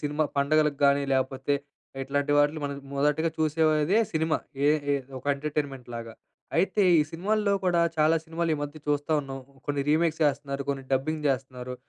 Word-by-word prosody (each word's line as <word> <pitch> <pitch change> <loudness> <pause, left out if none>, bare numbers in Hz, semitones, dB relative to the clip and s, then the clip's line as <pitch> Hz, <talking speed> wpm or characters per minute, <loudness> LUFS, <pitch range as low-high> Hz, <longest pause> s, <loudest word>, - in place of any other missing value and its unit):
Cinema 150 +1 0
పండుగలకు 150 +1 +2
గానీ, 140 0 +4
లేకపోతే 135 +1 0 0.5
ఇట్లాంటి 145 +2 0
వాటిని 145 +2 +2
మనం 140 0 -3 0.2
మొదటగా 150 +3 +1
చూసేదే 155 +3 +2
సినిమా. 160 0 +1 0.3
ఏ - - +6 0.2
ఏ - - +3 0.2
ఒక 130 - -14
ఎంటర్‌టైన్‌మెంట్‌లాగా. 135 -6 -4 0.4
అయితే 195 +4 +2 0.2
ఈ - - +4
సినిమాల్లో 200 +5 0
కూడా 175 -2 +3 0.2
చాలా 155 +2 +4
సినిమాలు 165 +1 -2
ఈ - - -5
మధ్య 145 +2 -6
చూస్తూ 145 +1 0
ఉన్నాం. 135 -1 -7 0.3
కొన్ని 145 -1 0
రీమేక్స్ 160 +1 +2
చేస్తున్నారు. 140 -1 -1
కొన్ని 135 -1 -4
డబ్బింగ్ 150 +4 0
చేస్తున్నారు. 130 -1 -3
145 Hz, 150 wpm, -27 LUFS, 140-160 Hz, 0.5 s, ఏ